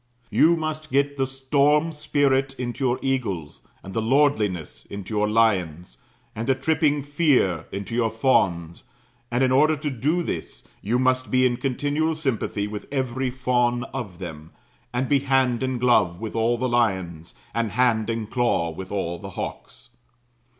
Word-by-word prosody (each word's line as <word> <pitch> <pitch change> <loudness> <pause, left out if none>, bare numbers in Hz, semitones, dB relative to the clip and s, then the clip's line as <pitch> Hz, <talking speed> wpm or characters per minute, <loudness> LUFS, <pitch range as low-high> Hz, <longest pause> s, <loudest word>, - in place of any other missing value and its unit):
You 170 +2 +5
must 155 -1 -4
get 140 +2 +1
the 135 -1 0
storm 140 +4 +2
spirit 140 -3 +1
into 125 +2 -4
your 125 -1 +2
eagles, 110 - -2 0.2
and 95 - -9
the 110 - 0
lordliness 110 - +1
into 100 +1 -7
your 105 0 +1
lions, 90 - +1 0.4
and 115 +2 -4
the 135 - +3
tripping 150 +1 +1
fear 140 - +2
into 100 +3 -5
your 115 -1 +1
fawns; 90 -8 +1 0.4
and 120 +2 +1
in 130 - +3
order 155 +4 +4
to 150 0 -3
do 150 +8 0
this, - - -5 0.2
you 115 +5 0
must 130 0 +1
be 130 0 +3
in 120 -1 +1
continual 145 +4 -1
sympathy 130 -8 -2
with 105 0 -6
every 130 -1 -1
fawn 125 -1 0
of 110 -10 -5
them; 80 -3 -8 0.4
and 125 +2 -1
be 140 +1 +3
hand 130 -3 +1
in 130 -1 -1
glove 110 -8 +2
with 110 0 -6
all 115 +1 +2
the 130 +2 -1
lions, 95 -9 -1 0.2
and 115 -4 -1
hand 115 -2 +2
in 115 -1 -2
claw 115 -7 0
with 95 +3 -8
all 85 -4 -2
the 100 - -8
hawks. 125 - -7
125 Hz, 165 wpm, -24 LUFS, 105-135 Hz, 0.4 s, You